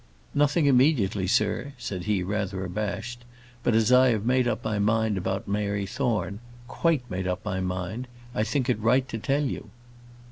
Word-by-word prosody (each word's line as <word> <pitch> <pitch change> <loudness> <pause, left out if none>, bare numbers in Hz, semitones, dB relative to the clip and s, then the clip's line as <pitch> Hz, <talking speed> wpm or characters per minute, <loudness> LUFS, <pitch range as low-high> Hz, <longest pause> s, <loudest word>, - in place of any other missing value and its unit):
"Nothing 145 +2 +3
immediately, 125 -8 +3
sir," 105 +8 +1
said 95 -7 -5
he, 105 -4 +1
rather 95 -1 -2
abashed; 110 +6 -4 0.4
"but 120 - +2
as 115 +1 +3
I 130 +1 +7
have 110 -3 0
made 125 0 +3
up 110 -1 -2
my 110 -2 0
mind 110 +1 +2
about 95 +1 -2
Mary 100 0 -1
Thorne, 110 -4 -1 0.3
quite 150 -3 0
made 95 -2 -3
up 90 +2 -3
my 95 -3 -1
mind, 95 +6 -3 0.3
I 105 - +1
think 125 +4 0
it 125 -4 +1
right 125 +4 +3
to 115 - -4
tell 140 +5 +1
you." 135 - -4
110 Hz, 175 wpm, -26 LUFS, 100-125 Hz, 0.4 s, I